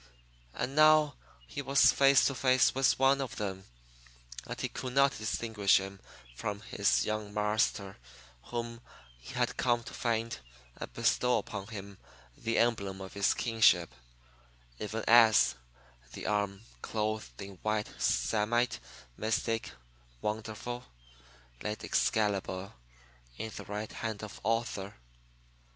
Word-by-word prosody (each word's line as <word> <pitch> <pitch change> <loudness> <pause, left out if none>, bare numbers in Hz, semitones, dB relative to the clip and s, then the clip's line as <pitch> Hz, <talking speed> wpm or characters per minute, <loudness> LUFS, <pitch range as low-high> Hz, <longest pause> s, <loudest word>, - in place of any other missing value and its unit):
And 135 +3 -3
now 155 -1 +6 0.3
he 145 - -5
was 140 0 +5
face 140 0 +5
to 135 - +2
face 130 -1 +3
with 135 -1 +3
one 135 +1 +4
of 130 - -4
them 95 -2 -4 0.8
and - - -6
he - - -1
could 125 -1 -6
not 140 0 +4
distinguish 110 -2 +2
him 95 0 -7 0.4
from 100 +10 -4
his 105 - +1
"young 110 -1 -3
marster" 105 -2 0 0.5
whom 115 0 -5 0.4
he - - -10
had - - 0
come 120 -2 +1
to 120 - -10
find 115 - -1 0.4
and - - -7
bestow 125 -1 +2
upon 100 -2 -5
him 100 -3 -9 0.4
the 115 0 -2
emblem 100 -5 +1
of 95 -1 -8
his 100 -1 +2
kingship 110 - +3 0.9
even 110 +1 -4
as 115 -2 +7 0.6
the - - -7
arm 100 -1 -1 0.2
"clothed 110 0 -3
in 100 -1 -8
white 110 0 -1
samite, 120 +3 +1 0.4
mystic, 115 +1 -1 0.5
wonderful" 110 - -4 0.8
laid 105 0 -4
Excalibur 100 -3 0 0.6
in 110 - -5
the - - -7
right 105 +1 -5
hand 110 -1 -5
of 105 - -8
Arthur. 110 -3 -1
110 Hz, 125 wpm, -31 LUFS, 100-120 Hz, 0.9 s, as